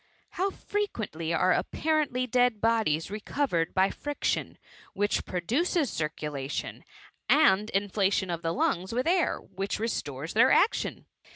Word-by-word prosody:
How 385 +2 0
frequently 220 - -3
are 180 +2 +3
apparently 295 - 0
dead 245 -2 +2
bodies 215 -8 +1
recovered 210 - -1
by 190 +1 +3
friction, 290 -1 -2 0.4
which 205 +1 0
produces 265 - 0
circulation; 150 -3 -4 0.5
and 215 -9 +4
inflation 195 -1 0
of 170 -1 -3
the 165 -1 -1
lungs 180 +3 0
with 250 +2 0
air, 350 +1 +2
which 195 +1 -4
restores 155 - -3
their 235 +4 +5
action. 415 - +2
205 Hz, 120 wpm, -28 LUFS, 170-260 Hz, 0.5 s, their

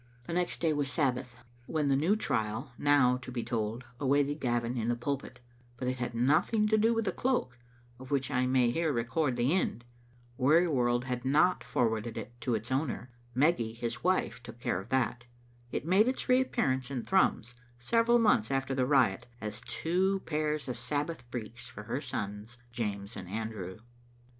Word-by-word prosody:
The 170 - -6
next 180 0 -1
day 165 -2 +3
was 145 -1 -1
Sabbath, 125 -3 0 0.3
when 150 -3 0
a - - +4
new 165 +9 +3
trial, 110 - -2
now 140 -4 +4
to 125 0 -9
be 120 -2 -3
told, 115 0 -2 0.2
awaited 145 +1 +2
Gavin 120 -2 0
in 115 -2 -1
the 120 - +2
pulpit; 125 0 -4 0.4
but 125 - -3
it 130 0 -1
had 120 -1 -3
nothing 155 - +3
to 220 - +4
do 225 +2 +4
with 225 -1 0
the - - +1
cloak, 245 - -1 0.4
of 130 - -10
which 140 -1 0
I 125 -1 +2
may 125 -2 +3
here 165 +4 +1
record 125 +3 0
the 125 +5 +2
end. 120 - -1 0.5
Wearyworld 130 -4 +3
had 125 -1 -3
not 155 +7 +3
forwarded 110 -1 -1
it 110 +1 -6
to 120 - 0
its 110 +4 -5
owner; 130 -2 -1 0.2
Meggy, 130 -5 +2
his 120 0 -4
wife, 185 -8 +1
took 120 -1 -11
care 90 -6 -1
of 100 - -14
that. 125 -2 0 0.5
It - - -3
made 190 +7 +4
its 260 - -1
reappear 255 - +3
ance 130 0 -2
in 130 -4 -3
Thrums, 155 -10 +2 0.2
several 230 - +3
months 210 - +3
after 135 0 0
the 130 -1 +1
riot, 130 -9 +3
as 110 +2 -4
two 185 +10 0
pairs 150 -2 -1
of 125 -2 -4
Sabbath 145 0 -3
breeks 120 0 -6
for 105 - -9
her 115 +6 -3
sons, 105 -3 -5
James 105 -3 -3
and 90 - -7
Andrew. 105 -3 -4
125 Hz, 180 wpm, -31 LUFS, 120-150 Hz, 0.5 s, a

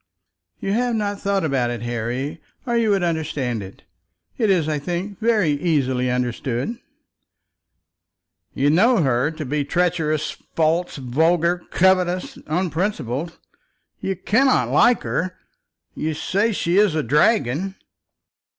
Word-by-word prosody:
"You 195 - -2
have 240 +1 +1
not 205 -2 -2
thought 200 -3 0
about 135 -5 0
it, 120 -1 -4
Harry, 120 +6 -3 0.2
or 240 -2 -1
you 230 -2 +2
would 195 -3 +2
understand 150 -8 -1
it. 95 0 -11 0.5
It 220 -4 +1
is, 175 -5 +2
I 150 -1 -1
think, 180 +6 -4
very 215 -8 +2
easily 135 -5 0
understood." 125 - -2 1.8
"You 140 +2 +2
know 210 +4 +4
her 130 +1 +2
to 155 -1 -6
be 145 +2 -1
treacherous, 160 -2 0 0.2
false, 165 +2 +1
vulgar, 165 +7 +1
covetous, 185 -1 +1
unprincipled. 165 - -2 0.6
You 195 - -2
cannot 255 +8 +2
like 240 +1 +4
her. 185 0 -2 0.6
You 155 0 -3
say 205 +8 0
she 185 -2 +1
is 205 -6 +3
a 155 - 0
dragon." 150 - +2
165 Hz, 125 wpm, -22 LUFS, 140-195 Hz, 1.8 s, know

